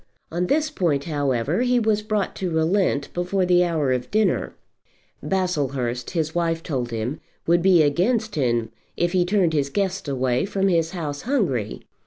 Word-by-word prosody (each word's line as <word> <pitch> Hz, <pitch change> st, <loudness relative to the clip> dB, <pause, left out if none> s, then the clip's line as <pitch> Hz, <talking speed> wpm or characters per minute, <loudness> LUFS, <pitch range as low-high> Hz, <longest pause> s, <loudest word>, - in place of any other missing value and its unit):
On 175 Hz, +2 st, -1 dB
this 310 Hz, +5 st, +1 dB
point, 160 Hz, -, 0 dB
however, 145 Hz, -, 0 dB
he 250 Hz, 0 st, +3 dB
was 215 Hz, -2 st, +1 dB
brought 210 Hz, -2 st, -2 dB
to 185 Hz, -, -2 dB
relent 160 Hz, -2 st, +1 dB
before 180 Hz, +2 st, 0 dB
the 180 Hz, 0 st, +4 dB
hour 160 Hz, -6 st, 0 dB
of 125 Hz, -1 st, -3 dB
dinner. 215 Hz, 0 st, +1 dB, 0.7 s
Baslehurst, 140 Hz, -10 st, -1 dB
his 160 Hz, -3 st, -2 dB
wife 165 Hz, -1 st, 0 dB
told 125 Hz, -6 st, -2 dB
him, 115 Hz, +6 st, -3 dB, 0.2 s
would 170 Hz, +1 st, +3 dB
be 180 Hz, -3 st, +5 dB
against 210 Hz, -, +1 dB
him 120 Hz, -5 st, 0 dB, 0.3 s
if 175 Hz, 0 st, +1 dB
he 180 Hz, -1 st, +3 dB
turned 180 Hz, -3 st, +2 dB
his 140 Hz, -2 st, +1 dB
guests 195 Hz, +1 st, -2 dB
away 130 Hz, -2 st, 0 dB
from 195 Hz, -1 st, 0 dB
his 165 Hz, -3 st, +2 dB
house 150 Hz, -5 st, -4 dB
hungry. 170 Hz, -, -1 dB
170 Hz, 165 wpm, -23 LUFS, 140-195 Hz, 0.7 s, be